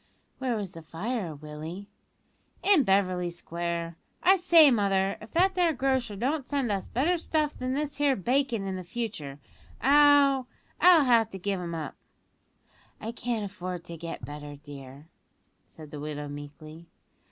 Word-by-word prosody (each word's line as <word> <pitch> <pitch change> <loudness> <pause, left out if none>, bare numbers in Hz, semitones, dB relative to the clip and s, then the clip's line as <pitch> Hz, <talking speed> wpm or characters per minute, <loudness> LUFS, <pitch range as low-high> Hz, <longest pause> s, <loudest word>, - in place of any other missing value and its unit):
"Where 255 -3 -1
was 200 -4 -4
the 165 - -10
fire, 175 +2 -4
Willie?" 155 +6 -8 0.8
"In 375 -6 +5
Beverly 185 -4 +1
Square. 170 0 -4 0.3
I 375 +2 +7
say, 340 -5 +6
mother, 195 -3 +1
if 215 - -11
that 375 +3 +3
there 350 -3 +2
grocer 260 -5 0
don't 270 +8 -1
send 270 -4 -1
us 195 -2 -2
better 330 +9 +1
stuff 310 -2 0
than 255 +1 -3
this 295 0 -3
here 285 -2 +3
bacon 245 0 0
in 190 -1 -4
future, 175 - -5 0.4
I'll 280 0 +5 0.3
I'll 355 -4 +7
have 230 -3 +4
to 195 - -7
give 195 +1 -2
him 170 -1 -4
up." 155 -3 -5 1.1
"I 225 - -5
can't 235 -2 -3
afford 185 -3 -6
to 170 - -8
get 165 +1 -6
better, 145 0 -8
dear," 140 0 -11 0.6
said 155 -2 -13
the 150 - -7
widow 150 0 -5
meekly. 150 +3 -10
200 Hz, 150 wpm, -28 LUFS, 165-270 Hz, 1.1 s, I